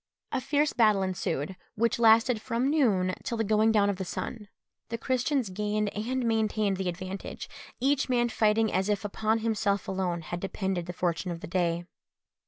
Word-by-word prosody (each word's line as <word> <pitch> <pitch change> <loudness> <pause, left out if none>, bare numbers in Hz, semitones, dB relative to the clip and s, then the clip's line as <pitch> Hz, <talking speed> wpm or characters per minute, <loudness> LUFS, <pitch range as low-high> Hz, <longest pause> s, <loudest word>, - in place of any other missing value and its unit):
A 270 - -1
fierce 295 +2 +1
battle 215 -5 +4
ensued, 180 -2 -2 0.2
which 230 +2 +1
lasted 225 0 +5
from 250 +4 0
noon 200 -12 +2
till 235 - -3
the 225 - +1
going 215 +1 +3
down 205 -2 +4
of 200 -2 0
the 190 - -3
sun. 210 +3 -5 0.4
The 230 - -2
Christians 255 -2 0
gained 210 +1 -1
and 245 +4 -1
maintained 215 -3 +1
the 190 -1 -1
advantage, 185 +2 -6 0.3
each 275 +1 +1
man 240 -1 +2
fighting 220 -1 +2
as 190 +2 +1
if 210 +1 0
upon 220 +2 0
himself 205 -3 0
alone 185 -3 -1
had 175 +2 -5
depended 190 -2 -2
the 175 - -4
fortune 175 0 -1
of 170 -1 -5
the - - -5
day. 175 -1 0
210 Hz, 180 wpm, -28 LUFS, 185-230 Hz, 0.4 s, lasted